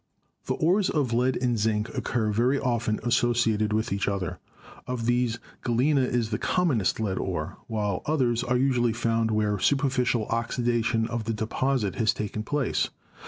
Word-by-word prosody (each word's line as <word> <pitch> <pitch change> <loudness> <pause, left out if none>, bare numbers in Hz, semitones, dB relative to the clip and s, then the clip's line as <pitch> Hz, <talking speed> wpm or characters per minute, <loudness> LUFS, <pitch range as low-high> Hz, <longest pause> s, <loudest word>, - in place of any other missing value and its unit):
The - - 0
ores 185 +5 +2
of 140 -6 0
lead 125 +2 +2
and 120 -3 +1
zinc 105 0 +1
occur 110 -3 0
very 120 +6 +2
often 120 -4 0
associated 120 -3 +2
with 110 0 0
each 100 - -1
other. 100 -4 -2 0.5
Of 125 -2 -3
these 120 -1 +1 0.2
Galena 130 +4 +2
is 120 -3 0
the 110 - -1
commonest 140 - +1
lead 100 -4 -1
ore, 85 -2 -3
while 105 -4 -1
others 125 -6 +1
are 125 0 +1
usually 125 -3 +2
found 115 -1 0
where 105 -2 +1
superficial 130 -3 +1
oxida 120 0 0
tion 115 -1 +1
of 115 -2 -3
the 115 - -1
deposit 110 +1 -1
has 110 -3 +2
taken 105 0 -3
place. 140 +4 0
115 Hz, 165 wpm, -26 LUFS, 110-125 Hz, 0.5 s, ores